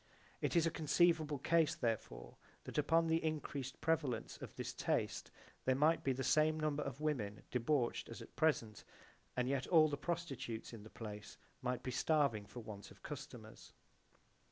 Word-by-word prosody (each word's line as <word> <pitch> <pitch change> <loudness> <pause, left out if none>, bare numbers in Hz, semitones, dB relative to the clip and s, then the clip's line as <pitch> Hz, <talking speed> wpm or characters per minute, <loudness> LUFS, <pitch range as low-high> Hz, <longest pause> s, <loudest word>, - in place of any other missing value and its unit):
It - - 0
is 170 -1 +5
a 165 - +2
conceivable 160 -1 +3
case 160 +3 +3
therefore 110 - -3 0.3
that - - -2
upon 165 +3 +4
the 165 0 +2
increased 145 -4 -3
prevalence 150 -8 0
of - - -9
this - - -4
taste - - -1 0.4
there 130 - +4
might 155 +4 +3
be 135 - +2
the 130 +1 -2
same 155 +3 +3
numbers 150 -1 0
of 140 +1 -6
women 115 -10 -1
debauched 125 +1 +1
as - - -7
at - - -12
present, 120 -9 +1 0.5
and 125 0 +2
yet 135 0 0
all 160 -3 +6
the 145 - -2
prostitutes 140 -11 -4
in 115 - -8
the 110 - -11
place 105 -2 -8 0.2
might 125 0 -2
be 130 - -2
starving 130 -7 +2
for 120 +4 -8
want 105 -3 -8
of - - -17
customers. - - -9
140 Hz, 170 wpm, -38 LUFS, 120-155 Hz, 0.5 s, all